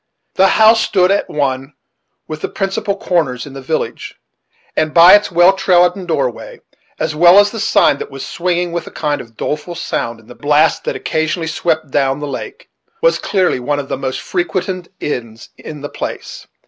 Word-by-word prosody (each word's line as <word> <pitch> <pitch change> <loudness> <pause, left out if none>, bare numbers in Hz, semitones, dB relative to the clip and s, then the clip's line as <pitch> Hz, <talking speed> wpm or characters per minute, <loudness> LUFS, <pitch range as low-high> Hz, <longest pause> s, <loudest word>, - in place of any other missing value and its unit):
The 190 - +4
house 220 +1 +6
stood 185 -3 +2
at 200 - 0
one 135 -1 -2 0.5
of 155 0 -6
the - - -3
principal 195 0 -2
corners 155 -11 -1
in 140 - -11
the 135 - -8
village; 155 +5 -4 0.6
and 155 -1 -1
by 170 +2 +9
its 205 -1 +4
well 175 +2 +5
trodden 180 -1 +2
doorway, - - -3 0.4
as 155 - -2
well 175 +4 +6
as 205 0 +5
the 225 - -6
sign 140 - +3
that - - -6
was 135 -1 -7
swinging 175 0 -2
with 170 0 -4
a - - -9
kind 145 -3 -2
of 115 -2 -16
doleful 150 +4 -4
sound 115 -8 -3
in 110 - -20
the 125 - -12
blasts 150 +4 +2
that - - -2
occasionally 160 +1 -2
swept 160 -2 -2
down 135 0 +1
the 150 - -4
lake, 145 - -7 0.4
was - - +3
clearly 185 -9 0
one 145 +4 -1
of 140 -1 -5
the - - -1
most 130 -1 -4
frequented 180 0 -3
inns 115 -5 -5
in 150 -2 -10
the 145 - -5
place. - - -7
160 Hz, 185 wpm, -16 LUFS, 140-185 Hz, 0.6 s, by